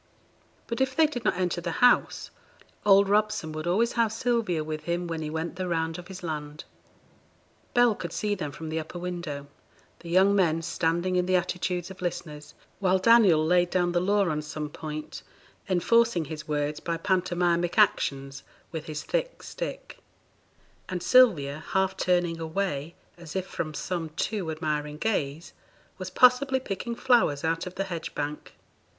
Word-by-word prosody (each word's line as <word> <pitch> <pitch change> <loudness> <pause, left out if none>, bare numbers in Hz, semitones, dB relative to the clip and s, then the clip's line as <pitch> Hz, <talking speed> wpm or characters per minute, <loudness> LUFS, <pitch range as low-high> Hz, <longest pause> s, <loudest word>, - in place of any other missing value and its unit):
But 235 +2 -3
if 260 -1 +1
they 320 +2 +5
did 255 -6 -3
not - - +2
enter 180 -1 -1
the 170 -1 -3
house, 245 +6 +3 0.6
old 200 0 +7
Robson 210 -5 +1
would 155 +2 -5
always 225 +7 +2
have 230 -3 +1
Sylvia 225 -8 0
with 155 0 -5
him 175 +1 -1
when 165 -2 -4
he 155 - -3
went 160 +3 -4
the 185 -1 -2
round 165 -1 -1
of 180 - -10
his 190 -1 -9
land. 150 -2 -5 1.1
Bell 245 -2 +5
could 170 -4 -6
see 210 +3 -1
them 155 -8 -4
from 160 +2 -7
the 160 +1 -1
upper 160 +3 -7
window: 170 -5 -5 0.5
the 170 - -10
young 190 +3 +4
men 165 -4 +2
standing 170 +2 0
in 180 0 +1
the 185 - +3
attitudes 180 0 -1
of 190 - -12
listeners, 150 -4 -5 0.2
while 190 -1 +3
Daniel 190 -6 +5
laid 175 +1 +3
down 175 -1 +1
the 175 - +2
law 200 +2 +2
on 150 -2 -1
some 150 0 -5
point, 155 0 -7 0.5
enforcing 190 0 +3
his 155 +1 -7
words 150 0 -1
by 170 -1 -3
pantomimic 175 -1 0
actions 140 -9 +2 0.3
with 160 -2 -6
his 155 -1 -5
thick - - -2
stick; - - -6 0.9
and 180 -2 -3
Sylvia, 155 - +4
half 190 0 +2
turning 175 -3 +1
away 165 -2 -3 0.2
as 170 -1 -10
if 190 -1 -1
from 155 -4 -5
some 170 -1 -3
too 185 +3 -3
admiring 150 -1 -3
gaze, 160 -5 -2 0.5
was 185 0 -5
possibly 255 +5 +4
picking 235 0 -4
flowers 235 - +2
out 165 +2 -1
of 180 - -8
the 195 - -1
hedge 175 -4 -6
bank. 150 +1 -5
175 Hz, 170 wpm, -27 LUFS, 155-195 Hz, 1.1 s, old